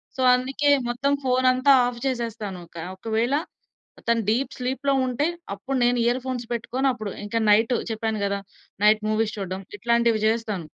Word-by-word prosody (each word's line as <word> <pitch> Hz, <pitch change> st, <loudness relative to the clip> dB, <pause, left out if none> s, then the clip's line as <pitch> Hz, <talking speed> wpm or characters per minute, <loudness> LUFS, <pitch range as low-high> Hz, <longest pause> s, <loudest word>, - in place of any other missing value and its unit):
So, 260 Hz, -, -3 dB
అందుకే 270 Hz, +3 st, 0 dB, 0.2 s
మొత్తం 270 Hz, +4 st, 0 dB
ఫోనంతా 255 Hz, +1 st, +3 dB, 0.2 s
of 240 Hz, -1 st, -5 dB
జేసేస్తాను 225 Hz, -7 st, -3 dB
కా 165 Hz, -, -5 dB
ఒకవేళ 225 Hz, +5 st, -1 dB, 0.7 s
తను 235 Hz, 0 st, +3 dB
డీప్ 245 Hz, +5 st, +1 dB
స్లీప్‌లో 265 Hz, +2 st, -1 dB
ఉంటే 255 Hz, +3 st, 0 dB, 0.3 s
అప్పుడు 260 Hz, +7 st, -3 dB
నేను 245 Hz, 0 st, +3 dB
ఇయర్ 240 Hz, +2 st, +2 dB
ఫోన్స్ 250 Hz, -2 st, -3 dB
పెట్టుకొని 255 Hz, +4 st, -1 dB
అప్పుడు 215 Hz, -5 st, -5 dB
ఇంకా 230 Hz, +2 st, -1 dB
నైట్ 225 Hz, +4 st, +4 dB, 0.2 s
చెప్పాను 220 Hz, -1 st, -2 dB
గదా! 200 Hz, 0 st, -1 dB, 0.4 s
నైట్ 215 Hz, 0 st, +5 dB
మూవీస్ 215 Hz, 0 st, 0 dB
చూడ్డం 190 Hz, -1 st, -4 dB, 0.2 s
ఇట్లాంటివి 235 Hz, +1 st, +2 dB
జేస్తాను. 220 Hz, -6 st, -1 dB
235 Hz, 150 wpm, -24 LUFS, 215-255 Hz, 0.7 s, నైట్